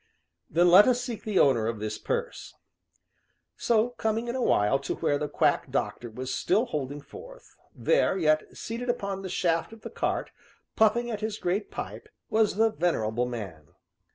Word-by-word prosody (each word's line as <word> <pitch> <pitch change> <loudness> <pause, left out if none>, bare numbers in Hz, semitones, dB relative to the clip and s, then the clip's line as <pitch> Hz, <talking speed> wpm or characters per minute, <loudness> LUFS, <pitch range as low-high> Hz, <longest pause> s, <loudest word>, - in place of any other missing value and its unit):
"Then 175 +3 +3
let 195 +6 +9
us 250 -1 +3
seek 245 -3 -5
the 210 -3 -1
owner 120 -8 +4
of 115 -1 -2
this 105 0 -4
purse." 480 0 -4 1.0
So, 230 0 +2
coming 225 -1 -2
in 240 - -3
a 260 - -1
while 105 - +3
to 140 - -3
where 145 - 0
the 150 - -2
quack - - +1
doctor 120 - -2
was 130 +3 -5
still 210 +7 +1
holding 145 - -4
forth - - -13 0.2
there, 485 - +2
yet 155 -3 +1
seated 235 +2 -5
upon 200 -5 -2
the 190 - -6
shaft 170 +3 0
of 225 - -13
the - - -8
cart, - - -2 0.4
puffing 235 +2 +3
at 215 -2 -4
his 215 -1 -3
great 195 +3 -2
pipe, - - -7 0.2
was 215 -3 +2
the 225 +1 +3
venerable 125 - 0
man. 95 -11 -7
190 Hz, 175 wpm, -27 LUFS, 135-225 Hz, 1.0 s, let